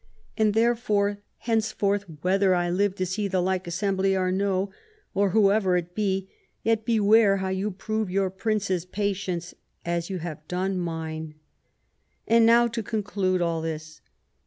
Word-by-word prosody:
And 215 -1 +2
therefore 215 -3 +2 0.2
henceforth, 215 -3 0 0.2
whether 190 0 +3
I 175 0 0
live 195 +2 +1
to 185 - -1
see 200 +3 -2
the 190 -1 0
like 185 0 -1
assembly 195 +2 0
or 185 -1 +1
no, 195 0 0 0.4
or 200 0 +2
whoever 195 -2 +3
it 175 0 -4
be, 195 -2 -1 0.4
yet 225 -1 +1
beware 215 -2 +4
how 190 0 -2
you 190 +2 -1
prove 215 +1 -3
your 190 0 0
Prince's 190 -3 -1
patience 185 -2 -3 0.3
as 170 0 -2
you 190 - -3
have 165 -3 -5
now - - -35
done 185 +1 -1
mine. 160 -2 -4 0.9
And 230 0 +5
now 235 +1 +6
to 230 0 -3
conclude 200 -4 -1
all 165 -1 -1
this. 155 -1 -6
195 Hz, 155 wpm, -26 LUFS, 180-210 Hz, 0.9 s, now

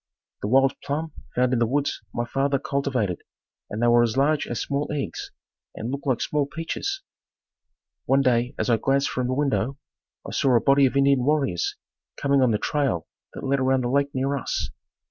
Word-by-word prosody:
The - - -2
wild 135 +4 +4
plum 155 +3 -2 0.2
found 125 0 +2
in 120 - +2
the 115 - +2
woods 145 +4 -1
my 120 - -2
father 140 +3 +1
cultivated 130 -9 -1 0.5
and 105 - -4
they - - +4
were 120 0 +6
as 120 +1 +1
large 145 +2 +2
as 120 - -3
small 140 +1 -2
eggs 145 -2 -4 0.5
and 115 +3 -4
looked 140 +1 -5
like 130 -4 +1
small 145 -2 0
peaches. 380 - -4 1.0
One 135 +1 +3
day 125 +1 +1
as - - -1
I 115 - +4
glanced 135 +3 +1
from 125 -1 -1
the 130 - -1
window, 135 -2 0 0.5
I - - -6
saw 130 -3 +2
a - - +6
body 140 +2 +5
of 135 - -2
Indian 140 -2 +4
warriors 135 - +1 0.4
coming 140 -1 +2
on 130 - +4
the 110 - +2
trail 135 - 0 0.3
that - - -7
led 135 +1 +1
around 130 0 +2
the 120 - -1
lake 140 +2 +2
near 135 +2 0
us. 135 - -2
135 Hz, 195 wpm, -25 LUFS, 125-140 Hz, 1.0 s, were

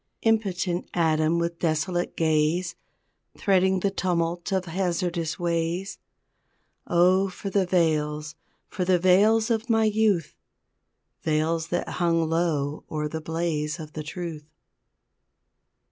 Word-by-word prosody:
Impotent 195 -5 0
atom 160 -1 +2
with 170 0 -2
desolate 175 +2 -1
gaze 160 +2 +1 0.6
Threading 190 -1 +2
the 200 - +1
tumult 175 -1 -1
of 190 -1 0
hazardous 175 -2 -2
ways 170 +2 -2 0.9
Oh, 185 +3 +3
for 195 +2 -6
the 195 -2 +2
veils, 155 -4 0 0.3
for 185 - -3
the 180 0 +3
veils 210 +6 +4
of 225 +1 -1
my 225 -1 +3
youth 215 -5 +1 0.9
Veils 160 +1 0
that 175 +1 -2
hung 165 -2 +1
low 155 -3 -1
o'er 150 -1 -2
the 160 +1 -5
blaze 160 -1 -2
of 155 -1 -9
the 155 - -4
truth! 155 -1 -6
170 Hz, 115 wpm, -25 LUFS, 160-185 Hz, 0.9 s, veils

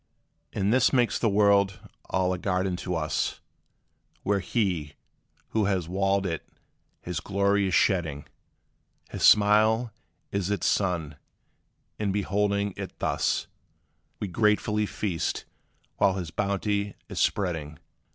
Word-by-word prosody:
And 100 +1 0
this 130 -1 +4
makes 125 -3 +2
the 115 - +2
world 100 -1 +3 0.3
all 95 0 +1
a 90 - -4
garden 95 0 0
to 90 0 -3
us, 80 -1 -1 0.8
Where 100 0 +1
He, 90 -9 -1 0.5
who 110 -2 +1
has 95 -4 0
walled 95 +2 +1
it, 85 -4 -3 0.6
his 85 -3 -3
glory 100 +3 +1
is 95 - +1
shedding: 80 -7 +1 0.9
His - - -6
smile 110 +3 +5 0.4
is 100 -1 -1
its 105 - -1
sun; 85 -7 0 0.8
and 105 -2 0
beholding 100 0 0
it - - -7
thus, - - 0 0.7
We 105 - -3
gratefully 105 +1 +1
feast, 90 -7 -2 0.5
while 100 -1 +3
his 90 -4 -4
bounty 100 +1 -1
is - - -5
spreading. 80 -6 -1
100 Hz, 120 wpm, -27 LUFS, 90-105 Hz, 0.9 s, smile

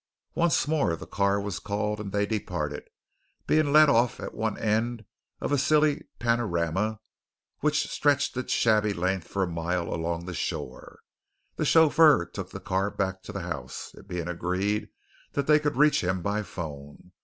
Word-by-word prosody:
Once 165 -4 +2
more 145 - +1
the 80 - -9
car 100 +3 +1
was 100 -2 -4
called 105 +1 -2
and 100 -2 -5
they 100 +1 +1
departed, 90 -8 -3 0.6
being 155 -2 +2
let 155 +1 +7
off 120 -3 +2
at - - -6
one 110 -1 -2
end 110 +1 -1 0.3
of - - -3
a 145 - +3
silly 150 +1 +2
panorama 105 -3 0 0.6
which 150 0 +1
stretched 145 -2 +1
its 125 0 -3
shabby 105 -2 +3
length 95 0 -1
for 100 - -1
a - - 0
mile 85 0 -2
along 85 +1 -3
the 90 - -5
shore. - - -5 0.5
The - - -1
chauffeur 155 - +6
took 95 +1 -7
the 95 - -8
car 95 +1 -1
back 95 -2 -2
to 105 - -9
the 100 -1 -5
house, 85 -1 -6
it - - -15
being 90 -3 -4
agreed 90 +4 -1 0.4
that 140 - 0
they 150 +1 +5
could 150 0 -1
reach 150 -4 +4
him 90 0 -1
by 105 +2 0
phone. 75 -3 -8
100 Hz, 170 wpm, -27 LUFS, 90-130 Hz, 0.6 s, let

